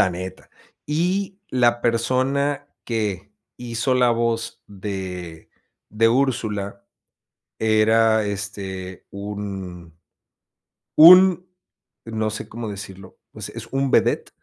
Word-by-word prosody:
La - - +5
neta, 95 +1 -8 0.4
y 185 +6 -1
la 120 -2 +2
persona 135 +5 0 0.2
que 105 -3 -3 0.2
hizo 120 +1 -1
la 125 -1 +4
voz 115 -1 -1
de 95 -4 -7 0.4
de 115 +1 +3
Úrsula 110 -6 -1 0.8
era, 110 0 +3
este, 95 -2 -6
un 95 -5 -7 1.0
un, 180 +2 +8 0.6
no 110 -1 -2
sé 105 - -7
cómo 115 0 -6
decirlo, 95 -2 -9 0.2
pues, - - -8
es - - -8
un 135 0 0
vedette. - - +2
110 Hz, 100 wpm, -22 LUFS, 100-125 Hz, 1.0 s, un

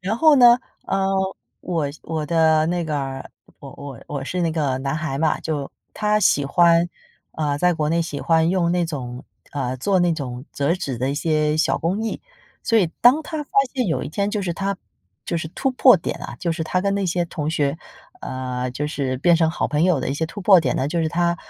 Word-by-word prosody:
然 195 +4 -2
后 315 -2 +6
呢， 240 -2 +7 0.3
呃， 195 0 0 0.5
我 165 -5 -2 0.2
我 160 -2 -3
的 160 -1 +3
那 175 0 -1
个 150 -2 -2
儿 135 -1 -5 0.3
我 135 - -10
我 140 -4 -9
我 140 -2 -4
是 180 +4 -3
那 165 -2 0
个 140 -5 -1
男 135 +3 -2
孩 155 -4 -3
嘛 160 -1 +1
就 145 -4 -3 0.3
他 210 0 +1
喜 145 -7 +3
欢 170 +3 +4 0.4
呃， 145 -2 -1
在 180 +2 +3
国 150 -1 -1
内 165 +2 +1
喜 150 -3 -5
欢 160 -1 +2
用 180 -2 +1
那 175 -1 +1
种 130 -4 -6 0.3
呃， 130 -3 -2
做 190 +9 +1
那 175 -1 +3
种 125 -4 -6
折 140 +3 0
纸 140 -9 -4
的 130 +3 0
一 - - -2
些 155 0 +1
小 155 - +1
工 185 +7 -1
艺。 225 - -3 0.4
所 230 - +2
以 185 -6 +2
当 255 +7 +6
他 310 0 -4
发 - - -38 0.2
现 255 -3 0
有 160 - -1
一 - - -5
天 200 +7 -1
就 210 -1 -2
是 175 -2 -2
他 195 +1 -2 0.5
就 170 - -1
是 160 -1 -4
突 265 +10 -1
破 255 -3 +6
点 170 - -4
啊， - - -7
就 170 -2 0
是 160 0 -3
他 185 +3 0
跟 200 +1 0
那 200 -1 -1
些 175 0 0
同 155 -2 -3
学 145 -2 0 0.4
呃， 125 -1 -4
就 145 +4 -3
是 140 -3 -2
变 170 +3 +4
成 160 -1 +2
好 165 - -1
朋 150 +1 0
友 180 -7 +2
的 - - -3
一 135 - -1
些 160 +3 -1
突 200 +5 -8
破 190 -1 +6
点 - - -1
呢， 130 - 0
就 170 +2 -1
是 160 - 0
他， 170 +1 0
160 Hz, 245 characters per minute, -22 LUFS, 145-180 Hz, 0.5 s, 呢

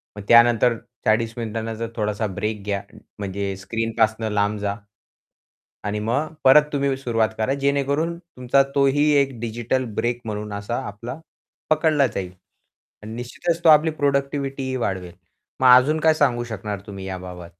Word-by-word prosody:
मग 105 - -8
त्यानंतर 120 0 +5 0.3
40 110 +1 +2
मिनिटानंतर 115 0 -4
थोडासा 105 0 -1
ब्रेक 105 +2 -4
घ्या 100 -1 -2 0.4
म्हणजे 100 0 -3
स्क्रीनपासून 110 +1 -1
लांब 105 0 0
जा. 100 0 -2 1.1
आणि 105 +1 -2
मग 130 +9 -1
परत 135 +3 +7
तुम्ही 140 -1 +1
सुरुवात 115 -4 0
करा 110 +5 0
जेणेकरून 140 +4 0
तुमचा 135 -6 +1
तोही 140 +2 +3
एक 135 -4 -3
डिजिटल 120 +3 -2
ब्रेक 120 0 -1
म्हणून 105 -1 -5
असा 100 +3 -4
आपला 115 +8 -7 0.5
पकडला 155 -3 +3
जाईल. 95 -4 -5 0.7
आणि 110 +1 -7
निश्चितच 165 +8 -3
तो 165 - +6
आपली 155 +1 +6
प्रोडक्टिव्हिटीही 140 -1 -1
वाढवेल. 95 -7 -3 0.5
मग 130 - +5
अजून 150 +5 +3
काय 160 0 +4
सांगू 125 -6 +1
शकणार 105 -3 -5
तुम्ही 100 -2 -8
याबाबत? 90 -2 -7
115 Hz, 140 wpm, -22 LUFS, 105-140 Hz, 1.1 s, परत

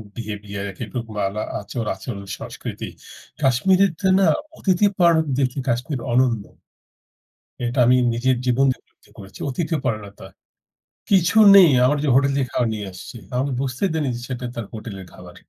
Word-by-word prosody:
Behaviour 105 -3 -6 0.2
এক - - -14
রকম 115 -2 -6
আলা 105 +2 -4 0.2
আচার 110 +3 -5
আচরণ, 100 -1 -7
সংস্কৃতি। - - -7 0.5
কাশ্মীরেতে 185 +7 +2
না? 195 - +4 0.3
অতিথি 190 +1 +2
পরায়ণ 170 -3 +4
দেখি 130 0 0
কাশ্মীর 125 +3 -1
অনন্য। 120 -3 +2 1.2
এটা 120 +3 -2
আমি 125 +1 +5 0.2
নিজের 125 +2 +1
জীবন 125 +2 +3
দিয়ে 130 - -4
অনুভুতি - - -28
করেছি। 95 -1 -12
অতিথি 160 +4 -1
পরায়ণতা। 105 -6 -4 0.8
কিছু 190 +1 +3 0.2
নেই, 185 -4 +9 0.2
আমার 145 +3 +2
যে, - - 0
হোটেল 140 +1 +4
থেকে 130 -3 -1
খাবার 120 - +1
নিয়ে 105 -2 -5
আসছে। 90 +6 -10
তারা 125 0 -1 0.2
বুঝতে 130 +4 -3
দেয়নি 155 -4 -1
যে, 120 - -7
সেটা 125 -1 -5
তার 115 - -4
হোটেলের 105 -4 -8
খাবার। 90 -1 -13
125 Hz, 155 wpm, -22 LUFS, 110-145 Hz, 1.2 s, নেই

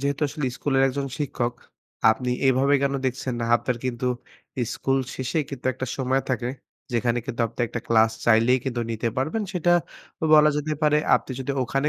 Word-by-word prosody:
যেহেতু 140 +2 -1
আসলে 150 0 -4
স্কুলের 135 -2 +1
একজন 140 +1 -2
শিক্ষক, 120 -4 -2 0.6
আপনি 125 +2 -1 0.2
এভাবে 135 +2 +3
কেন 140 0 +1
দেখছেন 130 0 -2
না? 115 - 0
আপনার 120 +1 +2
কিন্তু 125 -1 -2 0.7
স্কুল 135 0 0 0.2
শেষে 130 +5 -2
কিন্তু 135 -3 -6
একটা 130 - -5
সময় 130 0 +1
থাকে 125 -1 -1 0.4
যেখানে 120 0 +1
কিন্তু 120 - -4
আপনার 115 +1 -4
একটা 115 - -4
ক্লাস 110 -1 +5
চাইলেই 120 +3 +4
কিন্তু 125 -3 -2
নিতে 115 +1 -1
পারবেন। 155 +12 -1
সেটা 175 -2 +2 0.6
বলা 150 0 +7
যেতে 150 +1 -2
পারে। 150 0 +4 0.2
আপনি - - -1
যদি 130 - -3
ওখানে 135 +3 0
130 Hz, 170 wpm, -24 LUFS, 120-140 Hz, 0.7 s, বলা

